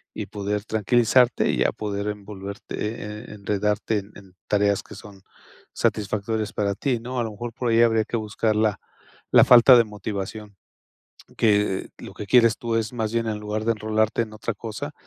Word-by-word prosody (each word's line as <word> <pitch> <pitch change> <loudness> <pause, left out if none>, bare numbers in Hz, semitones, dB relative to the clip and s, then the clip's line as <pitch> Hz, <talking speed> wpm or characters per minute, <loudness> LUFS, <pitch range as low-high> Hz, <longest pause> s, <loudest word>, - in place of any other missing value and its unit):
y 105 - -4
poder 105 0 -3
tranquilizarte 120 +3 +3
y, - - +1
a - - +2
poder 100 -1 -4
envolverte, 100 -1 -7
eh, 105 0 -5
enredarte 105 +1 -1
en 100 +1 -12
en 95 -2 -15
tareas 100 -1 +2
que 105 - -13
son 100 -1 -13 0.5
satisfactorias 105 +1 -1
para 100 -1 0
ti, 120 +4 -1
¿no? 125 +2 -4
A - - +1
lo 110 - -4
mejor 115 +3 -7
por 120 +1 -2
ahí 115 0 +4
habría 110 -2 +3
que 115 - -2
buscar 110 0 -1
la 105 -1 +1 0.5
la - - +8
falta 125 +1 +8
de 120 - +6
motivación, 105 -1 -6 0.8
que 105 -3 +1
lo - - -10
que 105 - -6
quieres 115 0 +4
tú 115 -1 -2
es 110 +1 -2
más 110 -2 -2
bien, 115 -1 0
en 110 -1 -2
lugar 105 +1 -4
de 115 - +3
enrolarte 110 +1 0
en 110 -1 -11
otra 110 +1 -4
cosa, 115 +8 -6
110 Hz, 185 wpm, -24 LUFS, 105-115 Hz, 0.8 s, la